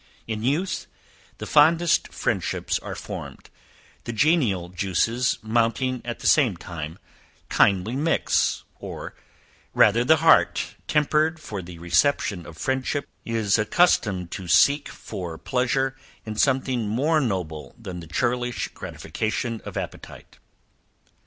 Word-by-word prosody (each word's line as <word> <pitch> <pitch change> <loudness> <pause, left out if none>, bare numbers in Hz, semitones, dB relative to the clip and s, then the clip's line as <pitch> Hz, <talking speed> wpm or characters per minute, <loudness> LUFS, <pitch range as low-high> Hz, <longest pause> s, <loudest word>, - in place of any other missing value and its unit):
In 110 -1 -4
youth, 150 - -1 0.5
the - - -6
fondest 165 +3 +4
friendships - - -1
are - - -7
formed, - - -8 0.5
the 120 - -3
genial 115 - +2
juices 100 +7 0
mounting 120 +3 0
at 120 -1 -6
the - - -8
same 125 - +4
time, 80 -1 -7 0.5
kindly 100 +4 +3
mix; 155 +4 +1 0.2
or, - - -7 0.6
rather 115 +3 +5
the 160 +6 +6
heart, 155 - +3
tempered 155 +2 +2
for 105 -10 -6
the 85 -1 -10
reception 85 +2 +1
of 80 - -11
friendship, 130 - -1 0.2
is 110 -2 +1
accustomed 105 - +2
to 95 - -6
seek 140 - +4
for 85 -3 -7
pleasure 130 +3 0 0.3
in 110 - -4
something 130 -2 +1
more 150 +8 +2
noble 90 - -3
than 95 -6 -7
the 85 - -10
churlish 125 +7 -1
gratification 110 +1 -4
of - - -6
appetite. - - -8
115 Hz, 120 wpm, -24 LUFS, 95-135 Hz, 0.6 s, the